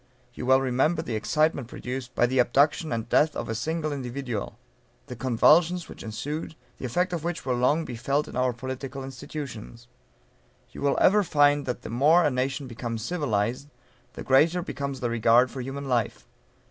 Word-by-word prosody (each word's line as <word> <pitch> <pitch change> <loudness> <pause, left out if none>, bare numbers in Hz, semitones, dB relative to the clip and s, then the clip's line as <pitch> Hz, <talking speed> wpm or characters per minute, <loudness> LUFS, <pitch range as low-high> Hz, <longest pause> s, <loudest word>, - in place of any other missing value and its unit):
You 125 - -6
well 130 0 +6
remember 135 +6 +1
the 125 - -5
excitement 150 +3 +1
produced 125 +1 -6
by - - +4
the 130 +2 0
abduction 145 +6 +2
and 115 -1 -2
death 150 +5 +3
of - - -4
a - - -1
single 155 +5 -2
individual; 125 -5 -5 0.5
the 130 -2 -8
convulsions 155 +9 +3
which - - -11
ensued, 145 +9 -5 0.2
the - - -5
effect 180 +9 0
of 165 -3 -3
which 175 0 -3
will 130 - 0
long 135 +7 +2
be 125 - -6
felt 140 +5 -1
in - - -9
our 125 0 +2
political 130 +2 -6
institutions. 130 -4 -8 0.8
You - - -10
will 140 -1 +1
ever 210 +2 +5
find 145 -5 +3
that 125 - -3
the - - -7
more 150 +9 +4
a - - +2
nation 135 +2 -2
becomes 115 -2 -5
civilized, 130 -4 -1 0.4
the - - -7
greater 160 +7 +3
becomes 140 -3 -5
the 120 - 0
regard 120 +2 +4
for 130 - -5
human 135 +2 -5
life. 120 -4 -1
135 Hz, 180 wpm, -26 LUFS, 120-150 Hz, 0.8 s, well